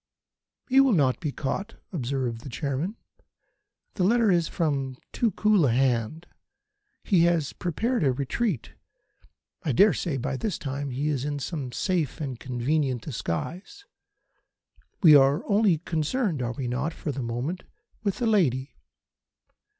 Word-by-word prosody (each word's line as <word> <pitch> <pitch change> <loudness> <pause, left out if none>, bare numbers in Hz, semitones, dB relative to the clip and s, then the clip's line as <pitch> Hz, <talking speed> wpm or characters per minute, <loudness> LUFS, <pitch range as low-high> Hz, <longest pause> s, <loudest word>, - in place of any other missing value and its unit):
"He 270 +1 +6
will 270 -3 +4
not 140 -7 +2
be 150 - -2
caught," 195 +11 -4 0.2
observed 125 -5 -2
the 135 - -8
Chairman. 145 - -3 1.0
"The 185 - -1
letter 225 +2 +4
is 170 -2 +2
from 140 -6 -1
too 235 - +1
cool 210 -5 +3
a - - +2
hand. 125 +5 0 0.8
He 175 -5 +4
has 170 -5 +1
prepared 225 - -1
a 135 - +4
retreat. 140 - -2 0.9
I 145 - -1
dare 200 - +6
say 160 -7 -2
by 130 +1 -2
this 210 +6 -2
time 140 0 -4
he 140 +4 -1
is 135 -4 -1
in 145 0 -2
some 140 -3 -4
safe 170 +1 -1
and 135 -6 -4
convenient 130 0 -1
disguise. 175 - -5 1.2
We 155 -4 +9
are 140 +7 +4
only 205 -4 +3
concerned 165 - -1
are 120 -1 -2
we 125 +1 -4
not? 140 +7 -2
for 150 - -4
the 135 0 -4
moment 125 +10 -3 0.4
with 200 -3 -1
the 245 - -1
lady. 145 - +2
150 Hz, 145 wpm, -26 LUFS, 130-185 Hz, 1.2 s, We